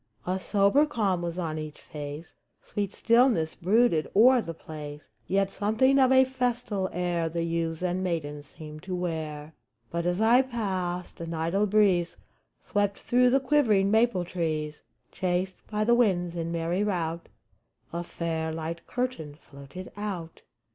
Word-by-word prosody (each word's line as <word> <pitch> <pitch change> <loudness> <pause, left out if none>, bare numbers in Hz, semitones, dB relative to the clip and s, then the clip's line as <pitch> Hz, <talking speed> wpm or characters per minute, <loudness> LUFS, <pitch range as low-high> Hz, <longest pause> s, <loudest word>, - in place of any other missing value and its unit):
A 185 +1 -1
sober 200 - +3
calm 200 -9 0
was 170 0 -4
on 160 -3 -2
each 155 -1 -7
face; 150 +2 -8 0.3
Sweet 200 -2 -3
stillness 230 -9 +3
brooded 190 -3 +2
o'er 245 +4 +7
the 165 - -5
place; 150 -2 -9 0.2
Yet 195 0 +1
something 225 +7 +2
of 260 -1 +5
a 260 0 +6
festal 245 -7 -1
air 175 -2 -1
The 165 +1 -2
youths 165 0 -2
and 180 +1 0
maidens 150 -5 -3
seemed 155 0 -10
to 185 +1 -4
wear. 160 -3 -4 0.4
But, 170 +1 -1
as 175 +2 0
I 230 +4 +6
passed, 190 -8 -3
an 165 0 -4
idle 170 +6 +1
breeze 190 -4 +3 0.4
Swept 205 -1 -1
through 250 +1 +3
the 270 +2 +4
quivering 240 -8 +3
maple 220 -5 +3
trees; 155 -4 -3 0.3
Chased 185 0 -2
by 215 0 -1
the 235 +2 +4
winds 185 -8 +2
in 170 0 -3
merry 170 +3 0
rout, 170 -5 -2 0.6
A 170 0 -2
fair, 165 -2 -3
light 165 +1 -5
curtain 245 -13 -3
floated 140 +4 -11
out. 190 -6 -5
180 Hz, 150 wpm, -27 LUFS, 165-210 Hz, 0.6 s, o'er